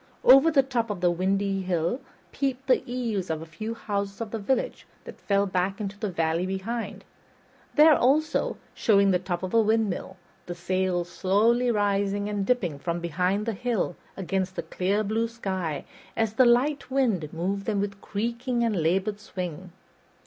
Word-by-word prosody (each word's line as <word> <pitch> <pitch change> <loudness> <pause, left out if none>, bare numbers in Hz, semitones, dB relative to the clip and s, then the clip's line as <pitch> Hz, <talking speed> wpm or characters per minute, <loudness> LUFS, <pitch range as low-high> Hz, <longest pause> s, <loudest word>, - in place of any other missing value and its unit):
Over 270 +5 +8
the 285 -4 +4
top 245 -4 -1
of 205 - -3
the 175 -1 +3
windy 195 +2 0
hill 180 +6 -1 0.3
peeped 270 -1 -2
the 260 -2 +3
eaves 225 -7 -2
of 160 -1 -1
a 160 - -8
few 215 +8 -6
houses 200 -3 -3
of 225 -2 -5
the 225 - -3
village 265 - -1 0.2
that - - -11
fell 200 0 +2
back 190 +1 -1
into 200 -1 -4
the 210 - -2
valley 165 0 0
behind; 200 +1 -4 0.7
there, 305 0 +7
also, 300 +6 +2 0.2
showed 200 -3 +3
the 180 - +2
top 180 -1 -4
of 185 - -4
a 230 - +6
windmill, 215 -4 0 0.3
the 175 - -5
sails 180 0 -1
slowly 220 +7 +2
rising 205 -2 +1
and 200 -2 -2
dipping 180 - 0
from 170 +3 -2
behind 180 +5 0
the 230 - -1
hill 225 -5 -1 0.2
against 190 0 -2
the - - -3
clear 200 +4 0
blue 220 +3 0
sky, 190 -10 -4 0.3
as 225 -2 +1
the 255 +3 +5
light 270 +5 +2
wind 225 - 0
moved 190 +4 -2
them 210 -3 0
with 200 0 -3
creaking 235 +3 -2
and 215 -7 +1
labored 190 +6 0
swing. 185 -4 -6
200 Hz, 170 wpm, -26 LUFS, 185-230 Hz, 0.7 s, Over